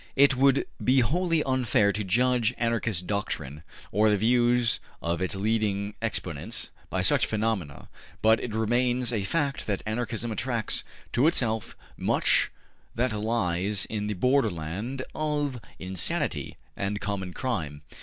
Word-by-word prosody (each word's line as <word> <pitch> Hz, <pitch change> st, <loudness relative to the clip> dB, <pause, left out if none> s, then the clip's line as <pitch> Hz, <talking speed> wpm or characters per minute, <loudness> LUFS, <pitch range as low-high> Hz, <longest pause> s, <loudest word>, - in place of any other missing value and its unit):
It 140 Hz, -1 st, +5 dB
would 135 Hz, +1 st, +4 dB, 0.2 s
be 130 Hz, +1 st, +4 dB
wholly 165 Hz, +4 st, +1 dB
unfair 120 Hz, -6 st, +2 dB
to 105 Hz, -, -2 dB
judge 120 Hz, +4 st, +2 dB
Anarchist 115 Hz, -6 st, 0 dB
doctrine, 75 Hz, -7 st, -3 dB, 0.3 s
or 105 Hz, +2 st, +4 dB
the 105 Hz, -, +3 dB
views 120 Hz, +2 st, +3 dB, 0.2 s
of 85 Hz, +1 st, -2 dB
its 95 Hz, +1 st, 0 dB
leading 100 Hz, -1 st, 0 dB
exponents, 105 Hz, -1 st, -2 dB, 0.2 s
by 95 Hz, 0 st, -1 dB
such 90 Hz, -, +4 dB
phenomena; 105 Hz, -, -2 dB, 0.4 s
but 110 Hz, +1 st, +5 dB
it 110 Hz, -3 st, -4 dB
remains 120 Hz, +2 st, +1 dB
a 110 Hz, -, 0 dB
fact 140 Hz, +5 st, -1 dB
that 100 Hz, -3 st, -1 dB
Anarchism 115 Hz, +1 st, -2 dB
attracts 115 Hz, 0 st, -1 dB, 0.3 s
to 125 Hz, +6 st, +4 dB
itself 115 Hz, -, +1 dB, 0.2 s
much -, -, +2 dB, 0.5 s
that 125 Hz, 0 st, +1 dB
lies 105 Hz, -3 st, 0 dB
on 105 Hz, -1 st, -2 dB
the 105 Hz, -, -2 dB
borderland 110 Hz, -, 0 dB
of 145 Hz, -5 st, -1 dB, 0.2 s
insanity 95 Hz, -1 st, -1 dB, 0.2 s
and 100 Hz, +1 st, -2 dB
common 100 Hz, -3 st, -3 dB
crime. 80 Hz, -, -3 dB
110 Hz, 135 wpm, -27 LUFS, 100-125 Hz, 0.5 s, It